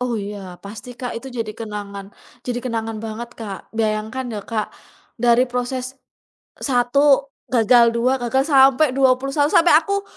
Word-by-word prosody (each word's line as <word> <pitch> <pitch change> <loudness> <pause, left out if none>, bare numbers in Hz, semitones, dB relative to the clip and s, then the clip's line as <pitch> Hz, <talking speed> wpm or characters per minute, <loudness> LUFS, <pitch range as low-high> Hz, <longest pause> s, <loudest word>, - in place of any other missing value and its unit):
Oh 250 -2 -1
iya 200 -3 -6
pasti 215 +4 -9
Kak, 245 -1 -5
itu 265 +3 -7
jadi 230 -4 -4
kenangan 205 -3 -7 0.4
jadi 245 -1 -2
kenangan 225 -2 -3
banget 225 +2 -6
Kak. 205 -4 -8
Bayangkan 220 +3 -1
ya 210 - -4
Kak, 220 -2 -3 0.5
dari 240 +1 +4
proses 250 +1 -3 0.7
1 275 +2 +2 0.2
gagal, 235 -1 +4
2 250 +3 +1
gagal, 255 +2 +1
sampai 270 +1 +5
21, 270 +2 +2
sampai 330 +3 +4
aku 400 +4 -2
245 Hz, 140 wpm, -21 LUFS, 220-265 Hz, 0.7 s, sampai